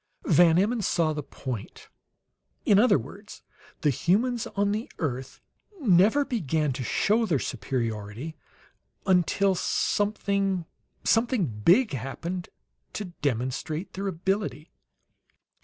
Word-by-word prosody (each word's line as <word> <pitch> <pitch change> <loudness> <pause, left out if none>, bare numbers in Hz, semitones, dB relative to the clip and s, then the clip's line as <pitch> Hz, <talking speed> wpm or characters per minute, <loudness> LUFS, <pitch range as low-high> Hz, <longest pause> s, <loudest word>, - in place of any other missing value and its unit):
Van 165 0 +5
Emmon 215 +5 +2
saw 165 -4 +1
the 150 - -3
point. 130 -5 -7 0.8
"In 200 -1 +5
other 245 -4 +5
words, 190 - -10 0.4
the 150 - +3
humans 225 - +1
on 200 0 +2
the 215 +3 -3
earth 135 -4 -4 0.4
never 220 - +4
began 155 - 0
to 130 - -4
show 220 - +2
their 165 -7 +2
superiority 115 +4 -4 0.7
until 190 +2 +3
something 200 -1 0 0.4
something 230 -3 +2
big, 170 - +3
happened 155 +8 -4 0.4
to 210 - -4 0.2
demonstrate 140 - -2
their 195 +1 -3
ability!" 175 - -2
175 Hz, 105 wpm, -27 LUFS, 135-205 Hz, 0.8 s, Van